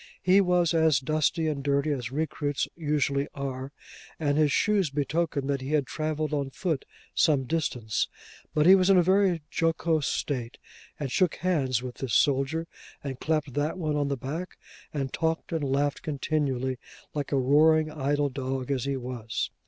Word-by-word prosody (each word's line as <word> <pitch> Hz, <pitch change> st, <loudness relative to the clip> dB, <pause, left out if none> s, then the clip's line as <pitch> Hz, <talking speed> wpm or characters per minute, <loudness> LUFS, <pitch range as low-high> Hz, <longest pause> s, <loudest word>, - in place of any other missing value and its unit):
He 190 Hz, +2 st, +5 dB
was 180 Hz, -3 st, +2 dB
as 160 Hz, -5 st, +4 dB
dusty 155 Hz, +4 st, 0 dB
and 145 Hz, -3 st, -2 dB
dirty 140 Hz, +1 st, +1 dB
as 125 Hz, -4 st, -3 dB
recruits 145 Hz, -1 st, -1 dB
usually 145 Hz, -3 st, 0 dB
are, 135 Hz, -1 st, -4 dB, 0.5 s
and 145 Hz, -3 st, +1 dB
his 150 Hz, -1 st, +3 dB
shoes 200 Hz, -2 st, +2 dB
betokened 145 Hz, 0 st, -1 dB
that 140 Hz, -1 st, -1 dB
he 135 Hz, +3 st, -4 dB
had 145 Hz, -3 st, +2 dB
travelled 155 Hz, +2 st, -2 dB
on 140 Hz, -2 st, -1 dB
foot 165 Hz, -2 st, -2 dB, 0.3 s
some 145 Hz, -4 st, +3 dB
distance, 125 Hz, -7 st, -1 dB, 0.4 s
but 150 Hz, 0 st, +2 dB
he 185 Hz, -, +9 dB
was 190 Hz, -1 st, +4 dB
in 195 Hz, -, +6 dB
a 180 Hz, -, +6 dB
very 185 Hz, -3 st, +3 dB
jocose 165 Hz, -2 st, +1 dB
state, 125 Hz, -4 st, -2 dB, 0.4 s
and 140 Hz, -4 st, -3 dB
shook 185 Hz, +1 st, +2 dB
hands 135 Hz, -9 st, 0 dB
with 125 Hz, -1 st, -7 dB
this 130 Hz, -4 st, -2 dB
soldier, 140 Hz, +4 st, +2 dB, 0.4 s
and 135 Hz, -3 st, -5 dB
clapped 155 Hz, -4 st, -1 dB
that 150 Hz, +6 st, -1 dB
one 155 Hz, -4 st, -1 dB
on 145 Hz, -1 st, +1 dB
the 140 Hz, -1 st, -1 dB
back, 160 Hz, +8 st, -5 dB, 0.3 s
and 135 Hz, -3 st, -3 dB
talked 160 Hz, 0 st, -1 dB
and 165 Hz, -3 st, -1 dB
laughed 140 Hz, +1 st, 0 dB
continually, 135 Hz, -4 st, -1 dB, 0.3 s
like 145 Hz, -2 st, -3 dB
a 140 Hz, -, +2 dB
roaring 155 Hz, +4 st, +4 dB
idle 145 Hz, -1 st, 0 dB
dog 130 Hz, 0 st, -3 dB
as 130 Hz, -3 st, -1 dB
he 140 Hz, -1 st, -1 dB
was. 120 Hz, -3 st, -4 dB
145 Hz, 170 wpm, -27 LUFS, 135-160 Hz, 0.5 s, he